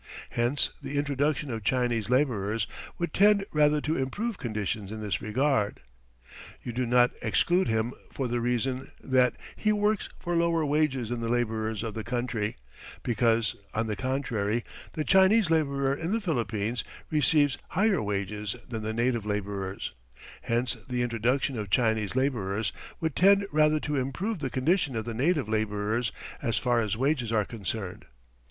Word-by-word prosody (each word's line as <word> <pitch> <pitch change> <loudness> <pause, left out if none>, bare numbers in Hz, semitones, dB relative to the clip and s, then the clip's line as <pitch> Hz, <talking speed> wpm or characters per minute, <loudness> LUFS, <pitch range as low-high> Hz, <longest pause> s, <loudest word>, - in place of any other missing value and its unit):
Hence 120 +5 +2
the 145 - -4
introduction 145 0 0
of 110 -2 -4
Chinese 120 -2 +1
labourers 115 -6 +1 0.3
would 170 -3 -2
tend 200 0 +5
rather 150 0 +4
to 155 +3 -1
improve 205 - -2
conditions 105 -3 -3
in 110 - -5
this 100 -4 -2
regard. 110 -1 +1 0.8
You 120 - -5
do 125 +1 -1
not 125 +1 +5
exclude 175 - +2
him 110 +2 0 0.2
for 135 - -2
the 120 0 -1
reason 125 +2 -1
that 130 -1 +2 0.2
he 215 - +1
works 210 0 +1
for 175 -1 -2
lower 170 -1 +2
wages 145 -5 +1
than 120 -1 -2
the 115 0 -2
labourers 110 -2 -1
of 110 -2 -4
the 110 - -4
country, 120 - -2 0.5
because, 115 -1 +2 0.2
on 110 +1 +1
the 110 -1 -2
contrary, 120 -4 -1 0.3
the 155 - -1
Chinese 190 +2 +5
labourer 140 -4 +2
in 165 +5 -3
the 225 - +2
Philippines 115 - -1 0.3
receives 150 -2 +3
higher 200 +1 +2
wages 105 0 -2
than 115 -3 -4
the 110 +1 -3
native 120 0 +1
labourer, 100 -2 -3 0.6
hence 120 +1 +1 0.2
the 125 -1 0
introduction 120 +2 0
of 105 -2 -4
Chinese 110 -1 +1
labourers 110 -7 0 0.3
would 160 -3 -2
tend 200 +1 +5
rather 155 0 +4
to 145 -1 -1
improve 170 - -2
the 135 -3 -2
condition 140 +1 +1
of 110 -1 -2
the 120 - -4
native 145 +4 +1
labourers 110 +1 0 0.3
as 115 - 0
far 120 -2 +2
as 110 -1 -1
wages 130 -3 +1
are 110 -2 +2
concerned. 105 -3 -5
125 Hz, 160 wpm, -28 LUFS, 110-150 Hz, 0.8 s, tend